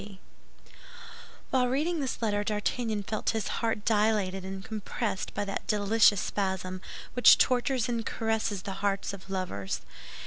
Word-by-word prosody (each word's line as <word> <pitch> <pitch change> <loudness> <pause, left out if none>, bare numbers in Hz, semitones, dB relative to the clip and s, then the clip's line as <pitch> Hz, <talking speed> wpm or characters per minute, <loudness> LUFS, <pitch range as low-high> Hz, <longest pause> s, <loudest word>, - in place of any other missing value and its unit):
—C.B." 200 -2 -11 1.3
While 255 -1 +3
reading 310 +7 0
this 265 -4 -3
letter, 205 -2 +1
D'Artagnan 215 +1 -1
felt 215 +2 -2
his 220 - -2
heart 225 -2 -1
dilated 210 -3 +2
and 190 0 -6
compressed 210 -1 -3
by 205 - -1
that 195 - -4
delicious 210 0 +4
spasm 190 -2 -2 0.3
which 245 - +8
tortures 255 -1 +2
and 235 -2 -1
caresses 220 -3 -1
the 200 - -4
hearts 200 0 0
of 195 -1 -10
lovers. 180 - -3
210 Hz, 140 wpm, -29 LUFS, 195-230 Hz, 1.3 s, which